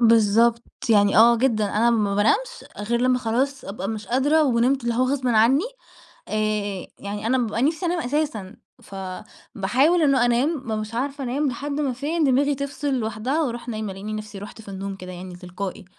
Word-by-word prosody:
بالضبط، 230 +1 +4 0.3
يعني 205 -2 +4
آه 235 +2 +7
جدًا، 225 -3 +1
أنا 220 +4 +2
ما 210 -3 +1
بانامش 470 - +1
غير 235 +3 -1
لمّا 255 0 +3
خلاص 260 +4 -1
أبقى 195 0 -5
مش 215 -2 -5
قادرة 290 +7 +3
ونمت 255 +1 +2
اللي 235 -1 0
هوغصبٍ 255 +1 0
عنّي. 240 - +4 0.6
آآ 210 -3 -2
يعني 205 +2 -4
أنا 260 +2 +2
بابقى 230 -2 -1
نِفْسي 315 +6 +1
أنام 345 0 0
أساسًا، 250 -8 -2 0.3
فباحاول 210 - -1
إنه 275 -5 +4
أنام، 245 +5 +2
ما 325 -5 -3 0.2
بابقاش 215 +1 -5
عارفة 275 +3 -3
أنام 275 +4 -1
لحد 285 +4 -5
ما 280 -3 -1
فين 305 +6 -1
دماغي 280 +1 +3
تفصِل 280 0 -3
لوحدها 245 +5 -1
وأروح 240 -2 -4
نايمة، 215 -3 -4
ألاقيني 205 +3 -6
نَفْسي 210 -1 -6
رُحت 205 +2 -10
في 205 - -12
النوم 195 0 -5
كده 185 -1 -9
يعني 180 0 -8
تلقائي. 185 +2 -6
235 Hz, 175 wpm, -23 LUFS, 210-275 Hz, 0.6 s, آه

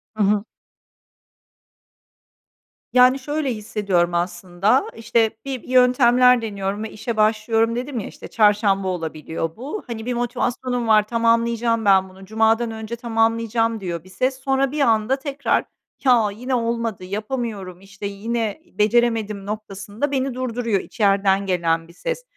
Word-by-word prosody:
Hı 215 - +1
hı. 205 0 +2 2.5
Yani, 255 +1 +6
şöyle 290 -1 -2
hissediyorum 200 -5 0
aslında, 175 +6 +1
işte, 225 -1 0
bir 265 -3 -4
yöntemler 250 -1 +5
deniyorum 200 -1 -3
ve 220 - -6
işe 225 +1 -5
başlıyorum, 225 +1 +2
dedim 250 0 -3
ya. - - -5
İşte, - - -11
çarşamba 205 -3 +2
olabiliyor 165 -2 -4
bu, 285 - -6
hani, 225 -2 -6
bir 250 - -1
motivasyonum 245 0 -2
var, 215 -1 +4
"Tamamlayacağım 230 0 +1
ben 190 -1 +4
bunu, 190 +1 -14
cumadan 220 +2 +2
önce 220 +1 -6
tamamlayacağım." 230 0 0
diyor 170 -4 -5
bir 185 - -17
ses. 255 +7 -1
Sonra 270 0 +1
bir 300 0 -2
anda 225 0 +3
tekrar, 280 0 -1 0.4
"Ya, 240 -5 +4
yine 250 +4 -2
olmadı. 230 -4 -2
Yapamıyorum, 205 -2 -4
işte, 200 +1 -10
yine 215 +3 -3
beceremedim." 215 - +1
noktasında 210 +5 -4
beni 270 -1 -1
durduruyor 240 -4 -1
içeriden 200 -2 +1
gelen 165 -3 0
bir 170 - -16
ses. - - -4
225 Hz, 135 wpm, -21 LUFS, 200-245 Hz, 2.5 s, Yani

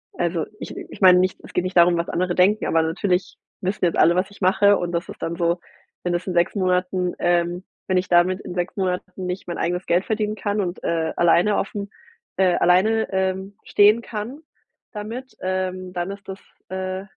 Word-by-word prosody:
also, 170 -1 -1
ich - - -7
ich - - -10
meine 180 -1 +8
nicht 185 0 0
es - - -13
geht 180 - +1
nicht 185 0 -4
darum, 170 0 +6
was 170 - -2
andere 180 0 -1
denken, 200 +4 +3
aber 165 0 +2
natürlich 180 +3 -1 0.3
wissen 185 0 -1
jetzt 170 - 0
alle, 170 +1 +5
was 190 +2 0
ich 200 - -17
mache 200 +2 +4
und 175 0 -3
das 170 0 -3
ist - - -9
dann 170 - -2
so, 170 0 +1 0.4
wenn 175 -1 -1
das 175 +2 -2
in 180 - -2
6 170 0 +2
Monaten, 180 -1 0
ähm 175 +1 +1 0.2
wenn 185 -1 +2
ich 180 - 0
damit 180 +2 +3
in - - -7
6 180 +2 -3
Monaten 185 0 -3
nicht 180 +1 -4
mein 175 - -4
eigenes 180 +2 -1
Geld 175 +3 +1
verdienen 215 -1 -1
kann 205 0 -1
und, 180 -1 -4
äh, 160 -1 0
alleine 175 +4 +4
aufm 200 0 -3 0.5
äh, 185 -2 +4
alleine, 210 +5 +3
ähm, 190 +1 -2
stehen 210 +3 +5
kann 230 +6 -6 0.5
damit, 230 +5 -7
ähm, 185 0 -2
dann 175 +2 -3
ist 200 0 -10
das, 190 - -6 0.3
äh, 190 0 -4
185 Hz, 205 wpm, -22 LUFS, 175-195 Hz, 0.5 s, meine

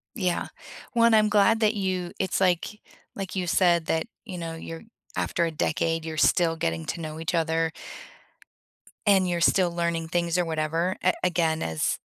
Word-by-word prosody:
Yeah. 180 -6 -1 0.4
One, 230 -1 +4
I'm 215 -1 +5
glad 210 +2 +4
that 215 0 +3
you 185 -3 -2
it's 190 0 -1
like 185 +3 +1 0.4
like 195 -2 -5
you 180 - -1
said 175 -2 +3
that, 160 0 0 0.2
you 185 -5 -7
know, 165 -1 -5
you're 165 0 -8 0.3
after 170 - 0
a 165 - 0
decade, 165 +1 -1
you're 160 -1 -5
still 165 +2 +3
getting 80 - -2
to 170 - -4
know 155 -1 -6
each 165 +2 -2
other 165 -1 +1 1.3
and 190 -3 +4
you're 175 -1 -1
still 180 0 +3
learning 170 -1 -1
things, 170 +1 0
or 180 - +2
whatever, 165 +3 -1
a 185 - +4
again, 165 -3 +1
as 80 -1 -1
170 Hz, 175 wpm, -26 LUFS, 165-185 Hz, 1.3 s, I'm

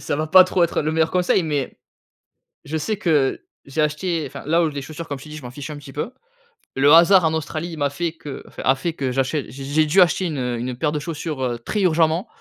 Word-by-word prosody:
ça - - -2
va 155 +1 -1
pas 185 +4 +8
trop 180 -1 +2
être 170 - -1
le 155 +1 -1
meilleur 160 0 +2
conseil 180 0 +2
mais 145 -4 -3 0.9
je 160 +2 -3
sais 195 +7 -2
que 150 -9 +1 0.2
j'ai 140 +3 -2
acheté, 155 +2 -1
enfin, - - -9
là 165 +3 +3
où 160 - +1
les 145 -1 -5
chaussures, 155 +3 -8
comme 145 - -4
je 135 - -12
t'ai 155 - -12
dit, 155 - -7
je - - -9
m'en 125 - -8
fiche 140 +3 -8
un 150 - -7
petit 140 -2 -12
peu. 150 - -4 0.6
Le 140 +2 +4
hasard 175 +2 +7
en 160 - +1
Australie 160 +1 -3
il 165 - -8
m'a 145 -1 +1
fait 165 +3 -3
que 150 -4 -9
enfin, - - -9
a 130 - +4
fait 165 +5 -3
que 135 -5 -2
j'achète 135 +2 -1
j'ai 135 +3 -8
j'ai 150 +3 +2
dû 175 +6 +4
acheter 180 +1 +3
une, 155 -5 -3
heu, 125 -1 -2
une 125 +2 -4
paire 150 +2 0
de 150 - -2
chaussures, 145 -6 -4
très 210 - -1
urgemment 165 0 +2
155 Hz, 260 wpm, -21 LUFS, 140-165 Hz, 0.9 s, pas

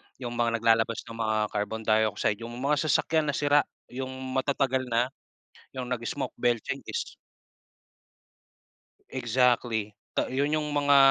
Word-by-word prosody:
yung 125 -2 -6
mga 115 -1 +2
naglalabas 115 0 +2
ng 115 0 -10
mga 110 -1 +1
carbon 105 +2 -2
dioxide, 110 -1 +2
yung 120 +1 -7
mga 145 +4 +1
sasakyan 155 0 +2
na 140 - 0
sira 145 0 +4 0.3
yung 130 +1 -4 0.2
matatagal 130 -1 +1
na, 120 +1 +1 0.7
yung 125 -1 -4
nag-smoke 125 +3 -3
bell 120 -1 +3
changes. 140 - -4 1.9
Exactly. 120 -3 +1 0.2
Ta - - 0
yun 140 +3 0
yung 155 -1 0
mga 145 -1 +4
125 Hz, 130 wpm, -28 LUFS, 115-140 Hz, 1.9 s, sira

